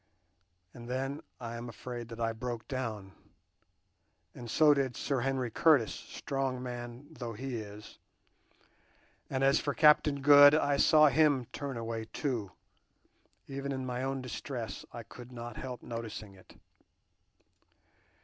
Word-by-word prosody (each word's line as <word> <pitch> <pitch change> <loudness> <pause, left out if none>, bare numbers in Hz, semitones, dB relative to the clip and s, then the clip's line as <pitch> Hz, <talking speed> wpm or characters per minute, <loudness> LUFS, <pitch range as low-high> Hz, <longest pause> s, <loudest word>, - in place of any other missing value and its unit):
And 120 0 -10
then 135 +3 -2 0.2
I 115 -1 -6
am 120 +1 -6
afraid 120 0 -7
that 115 0 -8
I 115 -1 0
broke 115 -1 -5
down, 110 -7 -4 1.2
and 120 -1 -9
so 150 +5 +6
did 135 -3 -1
Sir 140 -3 -1
Henry 130 -1 -1
Curtis, 145 -4 +4
strong 135 -2 -4
man 120 +1 -7
though 120 -7 -6
he 125 +2 -4
is; 105 -1 -9 1.3
and 135 0 -1
as 135 +2 +5
for 145 - -2
Captain 150 -2 +5
Good, 145 0 +9
I 145 -2 +2
saw 155 +1 +6
him 145 -2 +3
turn 140 -3 -4
away 115 -1 -4
too; 115 -8 -3 1.0
even 140 0 -4
in 130 -1 -3
my 125 0 -3
own 135 0 -2
distress 120 -4 -5
I 120 - -7
could 120 +3 -12
not 120 -1 -7
help 125 -3 -6
noticing 115 -3 -6
it." 95 -1 -18
125 Hz, 140 wpm, -31 LUFS, 115-140 Hz, 1.3 s, Good